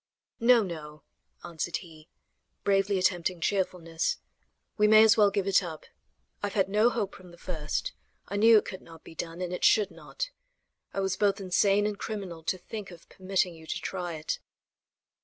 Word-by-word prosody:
"No, 235 -1 +6
no," 155 -4 -7 0.4
answered 170 0 -3
he, 160 -3 -14 0.5
bravely 195 0 +2
attempting 180 -1 +1
cheerfulness; 180 - -1 0.6
"we 210 0 +4
may 215 0 +8
as 220 0 +6
well 210 -2 +5
give 200 -1 -1
it 195 0 +5
up. 165 -4 -7 0.6
I 205 - 0
have 200 - -7
had 195 -2 +2
no 210 +4 +4
hope 220 -5 -2
from 180 -1 -13
the 170 - -15
first. 180 - -3 0.3
I - - -5
knew 225 +2 +7
it - - +2
could 190 - -7
not 165 -1 -14
be - - -12
done, 165 +2 -6
and 180 0 -3
it 180 - -4
should 210 -3 +4
not. - - -6 0.6
I 195 - -2
was 190 -1 -1
both 205 -1 +2
insane 195 +2 +2
and 210 -1 -2
criminal 195 -6 -5
to 185 - 0
think 205 +3 -7
of 170 -2 -14
permitting 190 -1 -1
you 160 -1 -14
to - - -3
try 180 -3 -4
it." 155 0 -3
190 Hz, 185 wpm, -28 LUFS, 170-205 Hz, 0.6 s, may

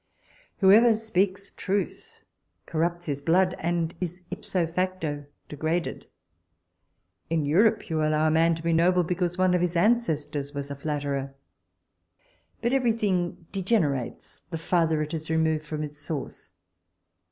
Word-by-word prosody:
Whoever 220 +4 +7
speaks 200 -2 -1
truth, 450 - -3 0.4
corrupts 170 +2 -1
his 140 -2 -3
blood, 180 +4 +3
and 170 0 -1
is 180 0 -4
ipso 180 -3 -1
facto 165 -4 -2 0.2
degraded. 160 +3 -2 1.2
In 160 -2 +1
Europe 205 +9 +3
you 160 -1 -1
allow 155 0 +2
a 155 - +3
man 165 +1 +4
to 165 - -9
be 170 0 +1
noble 180 +2 +4
because 180 +1 -1
one 185 -1 +3
of 180 - +2
his 175 0 0
ancestors 155 -9 +1
was 140 0 -4
a - - -3
flatterer. 140 -2 -3 1.3
But 235 +2 +1
every 250 -4 +3
thing 185 -6 -1
degenerates, 180 - -1
the 165 - -3
farther 165 -2 +1
it 150 +2 -6
is 160 -1 -4
removed 160 -1 +1
from 155 0 -3
its 150 0 -8
source. 150 -1 -6
170 Hz, 140 wpm, -26 LUFS, 155-185 Hz, 1.3 s, Whoever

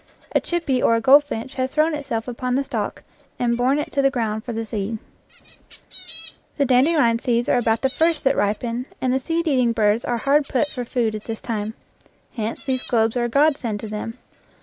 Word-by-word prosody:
A - - +2
chippy 325 -8 -1
or 230 - +4
a - - +2
goldfinch 265 -1 +3
has 260 - 0
thrown 310 +1 +3
itself 275 -6 -3
upon 250 +1 -2
the 275 - +1
stalk - - -4 0.3
and 235 -1 +1
borne 255 +4 +2
it 295 - -3
to 280 - +1
the 275 - +4
ground 220 -5 -2
for 240 - -5
the 225 0 -3
seed. 220 0 -3 1.6
The 285 - +3
dandelion 255 -2 +3
seeds 240 -1 0
are - - +3
about 225 -1 +1
the 265 - +3
first 325 +1 +1
that 270 +1 +3
ripen, 230 +5 -1
and 255 -1 0
the 265 - +2
seed 330 +5 -2
eating 250 -5 +2
birds 215 0 +2
are 240 - -1
hard 280 +4 +2
put 280 +3 0
for 245 -3 -5
food 235 -3 0
at 215 -1 -6
this 225 -1 -5
time. 220 -1 -4 0.6
Hence 225 -2 -4
these 260 -2 0
globes 225 -1 +1
are 240 -1 +1
a - - -2
godsend 275 -5 +2
to 220 - -5
them. 215 +3 -5
245 Hz, 205 wpm, -22 LUFS, 225-275 Hz, 1.6 s, or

